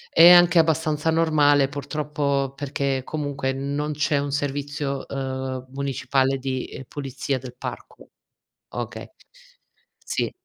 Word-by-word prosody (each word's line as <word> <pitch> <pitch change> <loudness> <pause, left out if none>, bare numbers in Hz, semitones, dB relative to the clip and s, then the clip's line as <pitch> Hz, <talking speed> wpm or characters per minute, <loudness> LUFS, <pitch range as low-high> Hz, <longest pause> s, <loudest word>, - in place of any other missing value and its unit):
È 165 +1 +10
anche 175 -1 +7
abbastanza 160 -1 +1
normale, 150 -4 +4
purtroppo, 145 -1 -2
perché 140 -1 -1
comunque 140 -3 -2
non 140 +3 -2
c'è 145 0 +1
un 140 0 -1
servizio, 145 -1 -2
ehm, 130 -1 -4
municipale 135 -1 0
di, 130 -1 -3
uhm, 135 - -7
pulizia 135 -1 -3
del 125 -1 -9
parco. - - -8 0.6
Okay, - - -6 0.9
sì. - - -2
140 Hz, 115 wpm, -24 LUFS, 135-150 Hz, 0.9 s, È